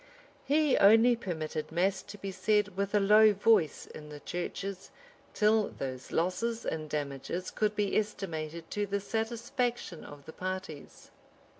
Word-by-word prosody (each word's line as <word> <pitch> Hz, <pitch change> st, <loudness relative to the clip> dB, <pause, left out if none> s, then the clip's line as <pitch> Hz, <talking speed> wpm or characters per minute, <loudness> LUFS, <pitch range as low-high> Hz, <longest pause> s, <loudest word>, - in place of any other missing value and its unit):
He 295 Hz, 0 st, +3 dB
only 225 Hz, +4 st, +6 dB
permitted 160 Hz, -8 st, -4 dB
mass 190 Hz, +3 st, +1 dB
to 205 Hz, -, -11 dB
be 195 Hz, -1 st, -5 dB
said 210 Hz, 0 st, +1 dB
with 200 Hz, +1 st, -1 dB
a -, -, +5 dB
low 210 Hz, +2 st, +6 dB
voice 205 Hz, -5 st, +2 dB
in 150 Hz, 0 st, -11 dB
the 150 Hz, -1 st, -9 dB
churches, 185 Hz, +4 st, -5 dB, 0.5 s
till 215 Hz, 0 st, +3 dB
those 130 Hz, -1 st, -6 dB
losses 225 Hz, +7 st, -1 dB
and 155 Hz, -1 st, -3 dB
damages 145 Hz, +5 st, -4 dB
could 210 Hz, -1 st, 0 dB
be 205 Hz, -1 st, 0 dB
estimated 170 Hz, -6 st, -3 dB
to 205 Hz, 0 st, -1 dB
the 200 Hz, +1 st, -1 dB
satisfaction 235 Hz, -, -3 dB
of 145 Hz, -1 st, -12 dB
the 160 Hz, -, -10 dB
parties. 185 Hz, -5 st, -6 dB
195 Hz, 145 wpm, -30 LUFS, 160-215 Hz, 0.5 s, only